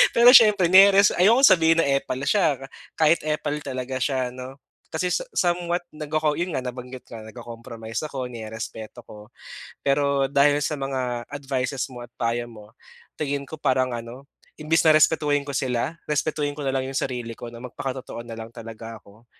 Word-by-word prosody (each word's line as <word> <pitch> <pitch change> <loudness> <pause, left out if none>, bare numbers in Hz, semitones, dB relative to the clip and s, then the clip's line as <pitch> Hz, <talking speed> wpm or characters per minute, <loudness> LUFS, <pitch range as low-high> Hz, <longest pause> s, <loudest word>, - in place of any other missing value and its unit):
Pero 240 +1 +8
siyempre 210 -6 +7
nireres 195 +1 +7
ayokong 230 +9 +6
sabihin 165 -3 +4
na 145 - 0
epal 135 -2 -1
sya 170 -9 +2
ka 135 - -8 0.3
kahit 160 +1 +4
epal 150 -1 -2
talaga 130 -1 -4
sya 130 -3 -1
'no, 130 +2 -9 0.3
kasi 180 - -1
sa - - 0
somewhat 175 -1 0
nagco-co 155 0 -1
yun 175 +1 -2
nga 130 - -2
nabanggit 125 0 -8
ko 115 - -9
nag-co-compromise 115 0 -8
ako, 130 -4 -5
nirerespeto 110 0 -8
ko 105 0 -13 0.6
pero 140 0 +2
dahil 145 +1 +4
sa 145 +3 -1
mga 130 -3 -3
advices 135 -2 -3
mo 125 - -9
at 120 - -25
payo 120 0 -1
mo 105 -2 -14 0.5
tingin 140 -2 -2
ko 160 - -8
parang 130 -2 +1
ano 120 +3 -8 0.3
imbis 155 +2 +1
na 155 - +7
respetuhin 150 -2 +3
ko 140 - -5
sila 130 +4 -1
respetuhin 150 0 -1
ko 150 - -5
na - - +1
lang 130 -1 -1
yung 135 - -6
sarili 120 -4 -3
ko 120 - -8
na 115 - -11
magpakatotoo 130 -1 -6
na 115 -1 -8
lang 115 0 -8
talaga 115 -1 -9
ako. 105 +4 -20
135 Hz, 175 wpm, -24 LUFS, 120-155 Hz, 0.6 s, Pero